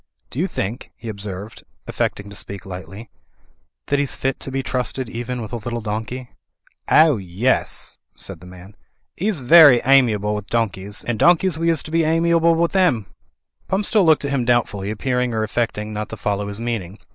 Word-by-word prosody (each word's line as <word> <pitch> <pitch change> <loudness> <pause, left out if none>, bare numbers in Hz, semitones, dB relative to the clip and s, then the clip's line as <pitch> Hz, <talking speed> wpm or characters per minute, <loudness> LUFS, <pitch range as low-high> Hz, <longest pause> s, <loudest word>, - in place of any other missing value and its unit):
"Do 130 - -5
you 180 - +1
think," 115 - -4
he 115 - -8
observed, 100 +1 -7 0.2
affecting 100 - -2
to - - -10
speak 100 0 -8
lightly, 95 +3 -9 0.7
"that 145 - +1
he's 145 -2 -1
fit 135 0 -2
to - - -6
be 135 0 -2
trusted 130 0 -2
even 120 +2 -4
with 110 - -9
a - - -1
little 120 +1 -4
donkey?" 115 +4 -5 0.6
"Ow, 155 -4 +6
yes," 100 +7 -1 0.2
said - - -6
the 90 - -13
man. 90 +3 -13 0.4
"He's 200 +1 -1
very 140 -1 +8
amiable 115 -6 +4
with 105 -1 -5
donkeys, 105 -3 -2
and 120 -3 -3
donkeys 175 -1 +4
we 165 0 +1
is 165 -2 +1
to 155 - -9
be 165 0 +2
amiable 165 +1 +3
with 170 +3 0
'im." 120 - +2 0.5
Pump 195 +2 0
still 210 -1 +3
looked 160 -3 +4
at 140 - -2
him 135 -3 +1
doubtfully, 115 -5 0
appearing 125 +2 -1
or 110 - 0
affecting 110 -1 -2
not 105 0 -4
to 110 - -7
follow 100 0 -2
his 100 +1 -5
meaning. 110 -5 -4
120 Hz, 185 wpm, -21 LUFS, 105-145 Hz, 0.7 s, very